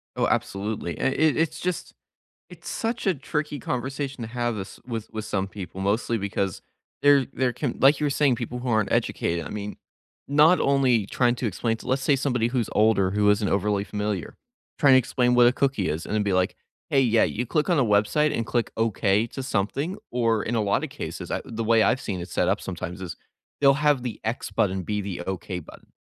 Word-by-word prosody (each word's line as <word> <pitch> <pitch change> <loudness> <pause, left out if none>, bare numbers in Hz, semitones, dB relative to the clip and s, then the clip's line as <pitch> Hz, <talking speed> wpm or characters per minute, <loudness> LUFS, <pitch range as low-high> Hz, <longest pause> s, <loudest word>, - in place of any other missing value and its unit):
Oh, - - +1
absolutely, 100 -4 -2
it 135 - +1
it 155 -1 +3
it's 160 0 0
just 180 -1 -3 0.6
it's - - -11
such 225 -1 -3
a 190 - +3
tricky 150 0 -3
conversation 135 +1 -4
to 110 - -5
have 120 -1 -1
this 95 -1 -7
with 115 -3 -5
with 110 -1 -4
some 95 -1 -2
people, 95 -1 -8
mostly 110 +3 0
because 100 -2 -2 0.4
there 145 -3 +5
there 130 -2 0
can 125 +1 -3
like, 140 +3 +5
you 150 - +1
were - - 0
saying, 135 -3 +2
people 120 +1 -5
who 125 - -4
aren't 110 -3 +1
educated, 85 -1 0
I - - -6
mean, 105 0 -5 0.5
not 150 +5 +5
only 130 -7 +3
trying 120 +1 +2
to 120 - -2
explain 115 +3 -1
to - - -12
let's 130 +1 +1
say, 140 +1 +3
somebody 125 -4 0
who's 120 -3 -1
older, 105 -3 +3
who 105 +1 +2
isn't 105 -1 +2
overly 100 +1 +1
familiar, 105 -2 -3 0.4
trying 140 -3 +6
to - - +8
explain 125 0 +1
what 120 0 +6
a 120 - +5
cookie 135 -7 0
is 80 +2 -3
and - - -3
then 105 - +2
be 100 -2 0
like, 90 0 +1 0.4
"Hey, 135 - +4
yeah, 115 -3 +4
you 120 +4 -2
click 150 +7 0
on 175 - +3
a 135 - +4
website 110 +9 +2
and 115 - -1
click 120 -2 0
'okay' 110 -1 +1
to 135 - -6
something," 135 - -1
or, 115 -3 +1
in 120 - -2
a 110 - +2
lot 100 0 +1
of - - -6
cases, - - -6
uh, - - -1
the 115 0 -4
way 115 0 +4
I've 130 - +2
seen 95 -5 -4
it 85 - -6
set 90 0 0
up 100 - +1
sometimes 90 0 -6
is, 90 - -6 0.4
they'll 140 -1 +6
have 150 -3 +2
the 120 -3 -5
x 110 -1 -3
button 95 -2 0
be 105 +3 -2
the 95 -3 -5
okay 95 -1 -4
button, 80 - -13
115 Hz, 220 wpm, -25 LUFS, 100-135 Hz, 0.6 s, to